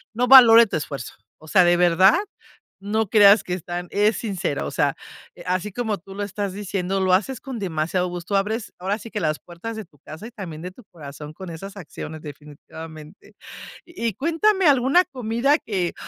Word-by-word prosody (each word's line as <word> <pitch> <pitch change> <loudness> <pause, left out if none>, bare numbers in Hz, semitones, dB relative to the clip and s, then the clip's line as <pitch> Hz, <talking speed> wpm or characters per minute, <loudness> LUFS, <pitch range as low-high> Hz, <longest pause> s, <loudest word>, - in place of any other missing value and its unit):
no 250 +2 +1
valore 235 -3 +9
tu 200 - -3
esfuerzo. 140 -4 -6 0.2
O 155 - -17
sea, 185 +3 +5
de 175 0 +3
verdad 180 +3 +5 0.6
no 215 +2 -1
creas 205 0 +6
que 180 - -3
están 175 0 -5
es 210 +1 +2
sincero. 190 -9 -3
O - - -6
sea, 145 -1 0 0.4
eh, 175 - -12
así 185 +3 -2
como 220 -3 -2
tú 195 +2 -13
lo 205 - -3
estás 200 0 -4
diciendo, 195 -1 -3
lo 185 -1 +2
haces 220 +7 0
con 265 -3 -7
demasiado 180 -1 -1
gusto. 175 +3 -4
Abres 215 +3 -2
ahora 195 +3 -2
sí, 230 - -10
que 210 - -4
las 155 -2 -1
puertas 175 +7 -8
de 220 - -7
tu 150 -4 -28
casa 160 +11 -10
y - - -12
también 180 -9 -8
de 180 +2 -7
tu 245 +7 -17
corazón 150 -2 -10
con 185 +3 -9
esas 195 +5 -9
acciones, 160 -3 -8
definitivamente. 155 +3 -12 0.5
Y 235 - -4
cuéntame 335 - +1
alguna 275 +6 +4
comida 250 0 0
que, 185 -5 -3
195 Hz, 190 wpm, -22 LUFS, 170-225 Hz, 0.6 s, valore